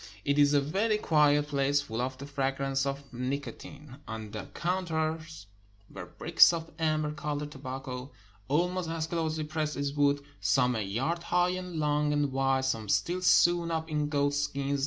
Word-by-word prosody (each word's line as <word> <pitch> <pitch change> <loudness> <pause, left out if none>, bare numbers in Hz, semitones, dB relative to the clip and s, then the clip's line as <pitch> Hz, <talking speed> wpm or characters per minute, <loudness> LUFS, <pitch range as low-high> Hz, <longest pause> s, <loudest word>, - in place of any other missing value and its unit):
It 140 +1 +2
is 145 0 +5
a 145 - +5
very 200 +10 +1
quiet 150 -5 +3
place, 140 0 +2
full 115 -4 -4
of 130 +1 -3
the 140 - -8
fragrance 135 -1 -1
of 140 +1 -3
nico 130 +4 -3
tine. 140 -2 -12
On 110 -1 -6
the - - -6
counters 160 - -2 0.5
were - - -8
bricks - - +5
of 165 -1 -5
amber 155 -1 +1
colored 150 0 -4
tobacco, 130 -1 -6 0.4
almost 175 +4 0
as 165 -1 -2
closely 160 -2 -2
pressed 155 -1 -2
as 140 0 -2
wood 145 -1 +2
— - - -30
some 125 -2 +3
a 110 - -1
yard 130 - -2
high 175 +1 +2
and 180 -1 -4
long 150 -1 +1
and 145 -2 +1
wide, 135 0 +1
some 115 -5 -2
still 180 - +1
sewn 175 -1 +4
up 160 -1 -3
in 150 -1 0
goat 145 -1 +1
skins. 140 0 -1
145 Hz, 180 wpm, -29 LUFS, 135-160 Hz, 0.5 s, is